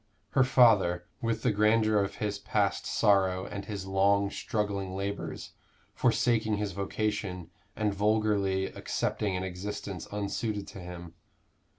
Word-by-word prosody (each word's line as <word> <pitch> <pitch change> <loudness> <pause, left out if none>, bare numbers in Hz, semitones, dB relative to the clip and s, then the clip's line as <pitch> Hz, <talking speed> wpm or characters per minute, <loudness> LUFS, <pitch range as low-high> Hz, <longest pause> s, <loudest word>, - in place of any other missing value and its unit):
her 130 - +4
father, 105 -9 +4 0.2
with 115 -2 -1
the - - +3
grandeur 110 +1 +3
of 100 0 -1
his 105 -1 -2
past 100 -2 0
sorrow 95 -3 +3
and 100 -1 -6
his 100 -3 -5
long 100 +1 +2
struggling 100 -3 -2
labors, 100 +1 -4 0.4
forsaking 110 -3 +2
his 105 -1 -2
vocation, 100 -2 -3 0.2
and 105 -2 0
vulgarly 100 -2 +1
accepting 95 0 -2
an 90 - -3
existence 95 0 -5
unsuited 105 0 -2
to - - -9
him. 85 -2 -8
100 Hz, 125 wpm, -29 LUFS, 95-105 Hz, 0.4 s, her